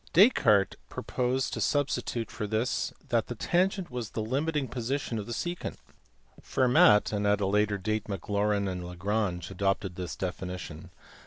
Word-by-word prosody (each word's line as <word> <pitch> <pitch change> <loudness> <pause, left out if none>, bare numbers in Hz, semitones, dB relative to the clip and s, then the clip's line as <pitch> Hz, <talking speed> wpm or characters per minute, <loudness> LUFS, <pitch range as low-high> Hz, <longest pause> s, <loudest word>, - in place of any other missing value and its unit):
Descartes 130 - +5
proposed 125 +1 -1
to - - -3
substitute 135 -5 0
for 105 - -4
this 110 +4 0 0.2
that - - +1
the - - -5
tangent 185 -1 0
was 120 -3 -4
the 110 - -3
limiting 140 +4 0
position 125 0 -2
of 100 - -6
the - - -6
secant; 175 +10 -3 0.7
Fermat, 120 -5 +4
and 105 0 0
at 105 0 +3
a 100 - +1
later 105 +1 +2
date 110 +2 -2
Maclaurin 100 +1 0
and 90 -1 -3
Lagrange, 90 0 -2
adopted 95 -1 -1
this 90 -1 -4
definition. 90 -3 -5
105 Hz, 150 wpm, -29 LUFS, 95-125 Hz, 0.7 s, Descartes